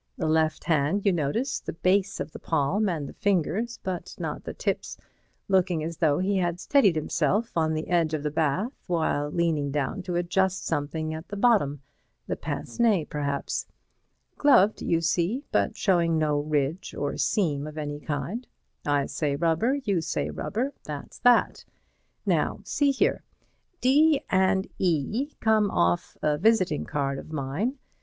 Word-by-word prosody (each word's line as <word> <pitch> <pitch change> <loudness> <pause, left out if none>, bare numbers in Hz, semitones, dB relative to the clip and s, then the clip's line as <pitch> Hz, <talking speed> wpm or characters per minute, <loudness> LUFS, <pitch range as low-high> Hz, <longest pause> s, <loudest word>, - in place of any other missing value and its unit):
The - - -2
left 155 0 +1
hand, 165 +5 +1
you 200 - +4
notice, 175 - -1
the - - -6
base 190 +3 +1
of - - -4
the - - -9
palm 165 +7 +1
and 155 -5 -3
the - - -9
fingers, 205 +3 0
but 185 -3 -4
not - - -5
the - - -5
tips, - - -2 0.5
looking 180 -4 +2
as 165 0 -4
though 150 -4 +3
he 195 +2 +1
had 175 -1 0
steadied 210 - +3
himself 170 +8 0
on 160 -1 +1
the 155 - -3
edge 165 -3 +2
of 150 - -4
the 150 - -1
bath 160 - 0
while 155 -4 0
leaning 155 -3 0
down 145 +7 -2
to 180 -1 -4
adjust 190 +2 0
something 155 +1 -2
at 160 +2 -7
the 205 - -6
bottom, 195 - +2 0.4
the - - -2
pince - - -6
nez 215 -9 +3
perhaps. 140 -1 -2 0.7
Gloved, 220 -8 +5
you 165 0 +1
see, 175 - 0
but - - +1
showing 170 -5 +2
no 150 -2 +1
ridge 150 +4 -1
or 145 - -2
seam 150 -8 0
of 155 0 -9
any 145 -1 -4
kind—I 145 - -3
say 145 -3 -1
rubber, 170 - +1
you 195 -6 +1
say 75 - -2
rubber. 240 - -2
That's 145 -2 -8
that. 245 -1 +3 0.6
Now - - +1
see 285 -1 +1
here: 275 - +1 0.6
"D 290 +3 +4
and 190 0 +3
E 190 - 0
come 215 -2 +3
off 85 - 0
a 150 -1 +1
visiting 185 -6 +2
card 140 -1 -2
of - - -11
mine. 155 - -2
170 Hz, 160 wpm, -26 LUFS, 150-200 Hz, 0.7 s, Gloved